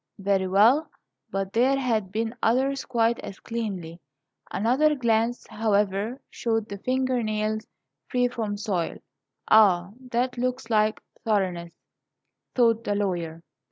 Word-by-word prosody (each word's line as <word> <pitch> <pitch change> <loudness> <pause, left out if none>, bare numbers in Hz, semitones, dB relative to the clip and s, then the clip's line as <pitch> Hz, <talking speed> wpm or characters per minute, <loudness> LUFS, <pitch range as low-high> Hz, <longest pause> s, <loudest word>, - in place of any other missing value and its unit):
Very 195 -1 +1
well; 230 +12 +4 0.4
but 195 0 -3
there 260 +4 +3
had 225 -8 0
been 225 +2 -2
others 270 +4 +1
quite 235 -2 +1
as 195 - -8
cleanly. 190 -8 -5 0.5
Another 255 +10 +2
glance, 235 -1 +1
however, 210 +2 0
showed 225 -2 -1
the 200 - -6
finger 255 +1 0
nails 215 0 -2 0.4
free 250 -1 +2
from 220 -4 -3
soil. 200 -6 -2 0.5
"Ah, 190 -4 +5 0.2
that 245 +1 0
looks 250 -1 -2
like 215 0 +2 0.2
thoroughness," 185 -6 -1 0.8
thought 230 -2 +3
the 205 - -1
lawyer. 170 -5 -2
220 Hz, 125 wpm, -26 LUFS, 200-245 Hz, 0.8 s, Ah